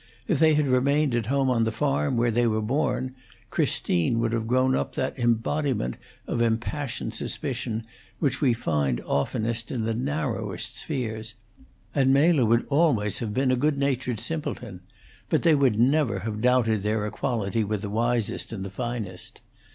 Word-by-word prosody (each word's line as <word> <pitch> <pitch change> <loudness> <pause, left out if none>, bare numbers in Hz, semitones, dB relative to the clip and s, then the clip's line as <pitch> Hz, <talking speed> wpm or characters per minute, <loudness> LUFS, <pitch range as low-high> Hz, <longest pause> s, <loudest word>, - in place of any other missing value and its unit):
If 155 - +1
they 155 -1 +5
had 150 0 +2
remained 140 +2 +2
at 120 -3 0
home 135 +1 +1
on 115 -2 +2
the 115 - 0
farm 135 +1 0
where 120 0 +2
they 120 +1 +2
were 110 -1 +1
born, 130 +1 -1 0.4
Christine 90 +7 +1
would 115 0 +1
have 115 -1 -1
grown 130 +2 +3
up - - -2
that 130 +1 -2
embodiment 120 - 0 0.3
of 120 - -2
impassioned 120 +1 -1
suspicion 120 -4 -3 0.3
which 140 -4 -1
we 135 -4 +4
find 75 - 0
oftenest 115 - -1
in 120 -4 -2
the 115 +1 0
narrowest 120 - -3
spheres, 110 -6 -4 0.6
and 135 -1 +3
Mela 145 -1 +4
would 115 +2 +3
always 140 -9 +2
have 110 -3 -3
been 130 +3 +1
a - - +3
good 145 +3 +1
natured 130 -4 -1
simpleton; 120 - -3 0.5
but - - +1
they 165 - +5
would 135 -7 +3
never 135 +1 +2
have 110 -1 -4
doubted 120 -4 +3
their 105 +1 0
equality 110 0 -1
with 105 0 -2
the 105 - -3
wisest 115 -5 0
and 100 -4 -5
the 100 - -6
finest. 110 -4 -5
120 Hz, 165 wpm, -26 LUFS, 110-135 Hz, 0.6 s, they